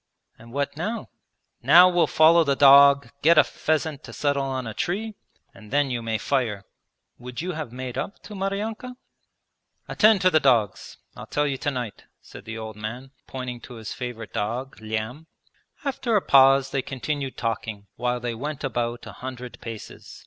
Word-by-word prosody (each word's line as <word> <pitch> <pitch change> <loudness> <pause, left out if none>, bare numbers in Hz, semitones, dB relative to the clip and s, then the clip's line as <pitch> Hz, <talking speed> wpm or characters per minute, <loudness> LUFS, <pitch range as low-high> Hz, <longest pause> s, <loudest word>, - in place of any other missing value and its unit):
'And 115 +1 -14
what 140 +2 -2
now?' 215 +8 -4 0.5
'Now 170 +8 +8
we'll 175 -2 +3
follow 165 +2 +5
the 140 -2 +1
dog, 140 0 +7
get 165 +2 +5
a - - +9
pheasant 155 -2 -2
to 115 - -10
settle 140 +3 0
on 130 -2 -3
a 110 - -5
tree, 215 - -2 0.4
and 105 - -15
then 145 +1 +1
you 120 -1 -2
may 115 -1 -1
fire.' 115 -7 -1 0.5
'Would 125 +3 -7
you 185 - -2
have 155 -7 -5
made 125 0 -5
up 200 - -5
to 210 - -10
Maryanka?' 210 +5 -4 0.9
'Attend 215 -3 +4
to 185 -1 +4
the 155 - +5
dogs. 115 -9 +1 0.2
I'll - - -9
tell 145 - 0
you 135 -2 -2
tonight,' 125 -7 -4
said - - -13
the 115 0 -6
old 110 -1 -7
man, 120 +5 -7 0.2
pointing 125 -2 -6
to 125 - -11
his 110 -2 -7
favourite 120 -3 -7
dog, 120 +6 -3
Lyam. 110 +8 -4 0.6
After 260 -4 -1
a 205 - +4
pause 135 0 +5
they 135 - 0
continued 135 +1 -4
talking, 110 -3 -3
while 125 0 -1
they 120 -1 -3
went 145 +6 -5
about 120 -3 -2
a - - -8
hundred 125 -1 -8
paces. 115 -2 -9
135 Hz, 175 wpm, -24 LUFS, 120-155 Hz, 0.9 s, a